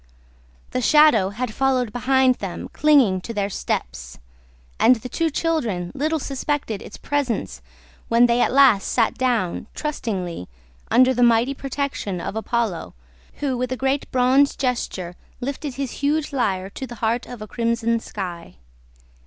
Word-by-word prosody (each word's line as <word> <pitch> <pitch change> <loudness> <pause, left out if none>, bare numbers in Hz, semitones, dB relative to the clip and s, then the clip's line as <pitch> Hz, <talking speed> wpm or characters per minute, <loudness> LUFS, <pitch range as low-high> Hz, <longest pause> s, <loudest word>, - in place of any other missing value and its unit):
The 255 - -1
shadow 300 -7 +5
had 220 +2 -4
followed 255 -4 +1
behind 260 +1 +3
them 190 -3 -6
clinging 270 -11 +4
to 230 +4 -7
their 200 0 -1
steps; - - -4 0.6
and 255 - +6
the 245 +2 -8
two 330 +4 0
children 240 - -1
little 310 +3 0
suspected 275 -6 -3
its - - -10
presence 250 - -2 0.5
when 235 +1 +5
they 240 0 +2
at - - +2
last 260 -7 +5
sat 230 -3 +2
down, 230 -7 -1
trustingly, 190 - -4 0.4
under 255 +2 +5
the 245 - -1
mighty 240 +2 +4
protection 270 -9 -3
of 185 - -5
Apollo, 220 - -2 0.5
who, 275 -3 0
with 250 +1 -2
a 255 - -2
great 270 +2 -1
bronze 260 +3 +3
gesture, 215 -9 -2 0.2
lifted 275 +1 -4
his 275 -1 -3
huge 295 +1 0
lyre 195 -7 -1
to 265 - -6
the 240 - -9
heart 230 +2 -1
of 245 - -8
a - - -9
crimson 230 0 0
sky. 180 -6 -7
245 Hz, 150 wpm, -22 LUFS, 210-270 Hz, 0.6 s, and